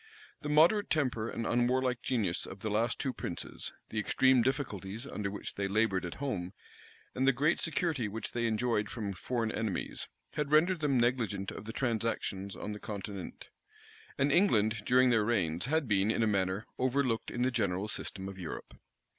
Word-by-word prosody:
The 150 - -4
moderate 165 +8 +5
temper 125 -7 0
and 115 - -3
unwarlike 125 +1 +1
genius 105 -9 0
of 95 - -9
the 110 - -2
two - - -2
last 115 +4 0
princes, 85 - -4 0.2
the 110 - -2
extreme 130 +4 +4
difficulties 115 -4 -2
under 105 -7 -3
which 100 - -5
they 100 0 -1
labored 100 -2 +1
at 85 - -5
home, 105 -11 -3 0.6
and 130 +1 +1
the - - +8
great 145 +6 +2
security 160 - 0
which 110 +2 -5
they 120 -1 0
enjoyed 110 -2 0
from 105 -5 -4
foreign 115 +5 -2
enemies, 110 -4 -3 0.3
had 150 -1 -1
rendered 170 +4 +4
them 145 -4 +2
negligent 115 -5 0
of 100 - -8
the 115 - -5
transactions 110 -5 -2
on 105 - -5
the 105 - -6
continent; 100 -2 -7 0.7
and 140 +1 +3
England, 110 - +3
during 125 0 +5
their 110 -2 +4
reigns, 90 -6 +1
had 155 +1 +1
been, 100 -1 +3
in 115 - +2
a - - +4
manner, 100 +1 0
overlooked 130 -2 +1
in 120 - -1
the 130 - +2
general 100 -4 0
system 95 -2 -3
of 95 -1 -8
Europe. 85 -4 -6
115 Hz, 180 wpm, -32 LUFS, 100-130 Hz, 0.7 s, the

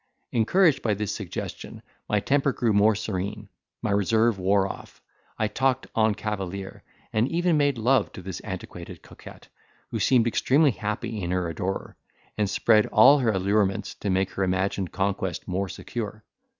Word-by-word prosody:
Encouraged 150 - +3
by 110 -3 0
this 105 0 -3
suggestion, - - -7 0.3
my 105 - +2
temper 140 +5 +1
grew 115 -3 0
more 105 +2 +4
serene, 105 0 -4 0.4
my 110 - 0
reserve 110 +2 +2
wore 95 +1 +2
off, - - -10 0.4
I 110 - +1
talked 130 +4 0
en 110 -2 +3
cavalier, 100 -2 -5 0.3
and 110 +3 +2
even 175 0 +1
made 145 -3 +2
love 125 +4 +2
to 90 - -9
this 95 -2 -6
antiquated - - -8
coquette, - - -14 0.4
who - - -2
seemed 125 -4 +3
extremely 140 +5 +3
happy 105 0 -4
in 85 - -3
her 90 -1 0
adorer, 90 +4 -4 0.4
and 105 -2 0
spread 110 +1 +3
all 135 +7 +6
her 120 -4 +2
allurements 100 0 0
to 100 - -5
make 95 0 +1
her 95 - -2
imagined 95 0 -1
conquest 95 -2 -2
more 95 +1 -2
secure. 110 0 -6
105 Hz, 160 wpm, -25 LUFS, 95-115 Hz, 0.4 s, all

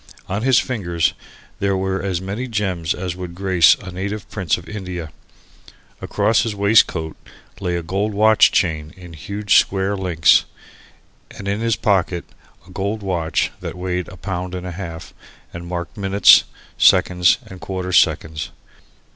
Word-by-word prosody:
On 100 +3 -2
his 130 +1 +3
fingers 85 -9 0 0.5
there 100 -1 0
were 95 0 -2
as 95 -2 -2
many 100 +7 -5
gems 95 -7 -2
as 90 -1 -4
would 90 -2 -7
grace 90 -3 +4
a 95 - -10
native 100 +3 -5
prince 95 -6 0
of - - -12
India; 90 -6 -6 0.9
across 115 - +1
his 110 -3 -2
waistcoat 100 -6 +2 0.4
lay 90 -3 -2
a 85 - -3
gold 100 +5 -1
watch 110 +1 +5
chain 80 -3 -1
in 90 -2 -12
huge 100 +6 +1
square 95 +1 -1
links 90 -5 +3 0.8
and 100 - -9
in 100 +1 -1
his 115 -1 +1
pocket 95 -5 0 0.4
a - - -15
gold 100 +3 -3
watch 85 -4 -1
that - - -6
weighed 90 -1 -3
a 95 - -11
pound 90 0 -4
and 90 0 -6
a 90 - -5
half 85 -2 -8 0.4
and 85 0 -8
marked 85 +3 -5
minutes, 100 -1 +5 0.3
seconds 90 -1 +4
and 95 -1 -12
quarter 95 -1 -4
seconds. 80 -3 +2
95 Hz, 155 wpm, -20 LUFS, 85-100 Hz, 0.9 s, watch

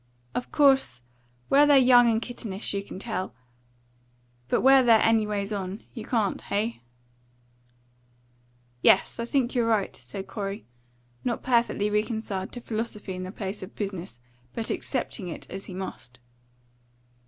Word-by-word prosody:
Of 245 - -4
course, 270 - +3 0.4
where 290 +2 +6
they're 290 -1 +7
young 245 -2 +7
and 225 -1 +2
kittenish, 225 -5 -4
you 200 - -1
can 200 - -9
tell; 195 -2 -4 1.1
but - - +1
where 270 0 +7
they're 230 -3 +6
anyways 210 -2 +1
on, 195 0 -4
you 230 - -7
can't. 220 -5 0
Heigh?" 210 - -2 2.0
"Yes, 195 - +4
I 230 - -1
think 255 -1 0
you're 240 -3 +1
right," 215 -4 +1
said 130 +10 -8
Corey, 200 0 -5 0.6
not 240 -2 -2
perfectly 235 -4 +2
reconciled 210 -3 -1
to 245 - -6
philosophy 215 -3 -4
in 185 - -5
the 185 0 -5
place 200 0 -4
of 185 +3 -9
business, 190 - -5 0.4
but 225 - -2
accepting 235 -7 -3
it 170 - -7
as 195 +1 -6
he 185 - -8
must. 125 -10 -7
215 Hz, 140 wpm, -26 LUFS, 195-235 Hz, 2.0 s, they're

